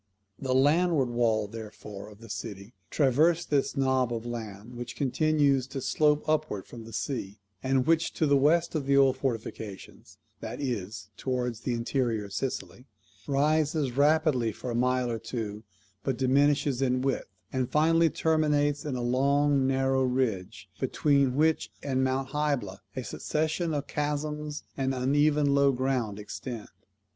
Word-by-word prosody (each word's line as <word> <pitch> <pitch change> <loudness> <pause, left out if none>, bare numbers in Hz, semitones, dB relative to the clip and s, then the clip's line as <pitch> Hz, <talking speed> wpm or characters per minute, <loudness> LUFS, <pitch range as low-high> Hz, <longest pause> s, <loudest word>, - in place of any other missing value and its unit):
The 130 -1 -1
landward 145 0 +3
wall, 115 -3 +1
therefore, 105 -2 -9
of 105 +1 -16
the 115 - -11
city 100 +3 -7 0.2
traversed 155 +5 +2
this 140 0 +1
knob 130 -2 +2
of 115 -1 -3
land, 115 -1 -6
which 120 0 -7
continues 140 -1 +2
to 135 - -5
slope 150 +2 +2
upwards 155 -11 -1
from 115 -2 -10
the 115 - -10
sea, 110 -4 -4 0.2
and 130 -1 +1
which 165 +1 +2
to 160 - +1
the 140 -1 +4
west 165 +5 +3
of 150 -4 -2
the 140 0 +4
old 135 -1 +5
fortifications 115 -6 -5 0.2
(that - - -6
is, 105 -7 -4
towards 125 -3 -2
the 120 0 -2
interior 115 -2 -1
of 100 - -10
Sicily) 110 0 -4 0.4
rises 150 0 +1
rapidly 145 -5 +3
for 120 +3 -6
a - - -2
mile 125 0 +1
or 115 - -3
two, 110 -2 -5 0.4
but 130 +3 -2
diminishes 140 0 +2
in 130 -1 +1
width, 135 -1 -1 0.3
and 130 -2 0
finally 165 +2 +4
terminates 150 -2 +1
in 145 -4 -2
a 125 - -2
long 140 +2 +2
narrow 135 0 +2
ridge, 110 -7 -1
between 140 0 +2
which 155 +2 +2
and 130 -2 0
Mount 130 0 0
Hybla 135 -10 -1 0.2
a 130 - -3
succession 155 - -1
of 145 -2 -2
chasms 150 0 -3
and 135 -1 -1
uneven 145 +2 +2
low 140 0 +4
ground 125 -5 -1
extend. 110 +2 -7
130 Hz, 150 wpm, -28 LUFS, 120-145 Hz, 0.4 s, old